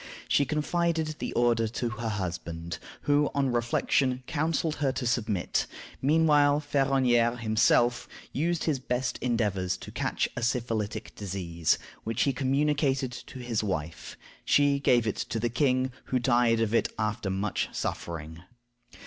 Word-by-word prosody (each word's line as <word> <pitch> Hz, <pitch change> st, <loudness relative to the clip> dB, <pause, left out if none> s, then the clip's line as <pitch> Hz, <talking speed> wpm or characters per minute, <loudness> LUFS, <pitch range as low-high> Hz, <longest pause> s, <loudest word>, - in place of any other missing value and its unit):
She 140 Hz, -, +3 dB
confided 160 Hz, +1 st, 0 dB
the -, -, -3 dB
order 120 Hz, -2 st, +2 dB
to 120 Hz, +2 st, -2 dB
her 115 Hz, -1 st, -4 dB
husband, 85 Hz, -4 st, -4 dB, 0.2 s
who, 145 Hz, 0 st, +2 dB
on 135 Hz, -2 st, +2 dB
reflection, 125 Hz, +2 st, +1 dB
counseled 160 Hz, +1 st, -1 dB
her 140 Hz, -2 st, +1 dB
to 130 Hz, -, -3 dB
submit. 110 Hz, -5 st, 0 dB, 0.3 s
Meanwhile 145 Hz, 0 st, +4 dB
Ferronnière 135 Hz, -5 st, +2 dB
himself 120 Hz, +2 st, +2 dB, 0.3 s
used 165 Hz, +3 st, 0 dB
his 150 Hz, -5 st, 0 dB
best 125 Hz, 0 st, -2 dB
endeavors 105 Hz, -7 st, 0 dB
to -, -, -10 dB
catch -, -, -1 dB
a 120 Hz, -, -3 dB
syphilitic 115 Hz, -3 st, -2 dB
disease, 85 Hz, -5 st, -1 dB, 0.3 s
which 115 Hz, 0 st, 0 dB
he 140 Hz, -, +1 dB
communicated 135 Hz, 0 st, +1 dB
to 125 Hz, -, -9 dB
his 120 Hz, -4 st, -2 dB
wife. 85 Hz, -5 st, -4 dB, 0.3 s
She 145 Hz, -1 st, +3 dB
gave 120 Hz, -4 st, +3 dB
it 110 Hz, -, -1 dB
to 115 Hz, -, -3 dB
the 120 Hz, +2 st, 0 dB
king, 130 Hz, 0 st, +1 dB
who 130 Hz, -, 0 dB
died 120 Hz, -2 st, +3 dB
of 115 Hz, -1 st, 0 dB
it 115 Hz, -, +3 dB
after 110 Hz, -2 st, -1 dB
much 95 Hz, +1 st, -1 dB
suffering. 80 Hz, -1 st, -5 dB
120 Hz, 140 wpm, -28 LUFS, 110-140 Hz, 0.3 s, Meanwhile